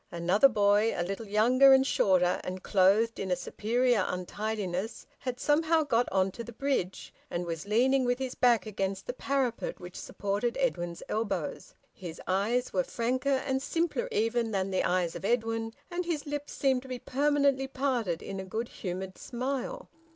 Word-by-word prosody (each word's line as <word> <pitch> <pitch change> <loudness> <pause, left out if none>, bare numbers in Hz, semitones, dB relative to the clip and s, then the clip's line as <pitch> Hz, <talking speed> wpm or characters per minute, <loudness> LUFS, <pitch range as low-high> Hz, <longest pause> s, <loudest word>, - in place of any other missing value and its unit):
Another 180 +10 +4
boy, 210 0 +3
a - - +1
little 195 +5 -5
younger 250 +6 +6
and 265 0 +5
shorter, 180 -8 +2
and 185 0 -5
clothed 205 +4 +3
in 190 - -3
a 180 - +2
superior 235 +4 +1
untidiness, 200 +1 -3
had 250 -1 -4
somehow 320 +2 +3
got 245 -4 +1
on 190 0 +2
to 235 - -7
the 235 - -9
bridge, 235 -7 -2 0.2
and 175 +1 -3
was 165 +2 -5
leaning 255 +5 +3
with 245 0 +1
his 260 -1 -3
back 235 -6 +3
against 195 -2 -3
the 245 - -3
parapet 260 -2 -1
which 180 0 -10
supported 205 +4 -2
Edwin's 175 -10 -1
elbows. 200 -7 -3 0.2
His 170 -3 -8
eyes 210 +7 0
were 185 -2 +2
franker 255 +5 0
and 265 0 0
simpler 330 -2 -1
even 230 +2 +1
than 195 -2 -1
the 185 - +1
eyes 180 -2 0
of - - -7
Edwin, 225 0 0 0.2
and 350 +1 -1
his 335 -4 -2
lips 290 0 -4
seemed 265 -2 +1
to 265 - -13
be 255 -1 -4
permanently 280 +1 +1
parted 255 -10 -1
in 195 - -5
a - - -4
good 220 +5 -4
humoured 185 0 -6
smile. 270 - -4
225 Hz, 175 wpm, -29 LUFS, 190-265 Hz, 0.2 s, younger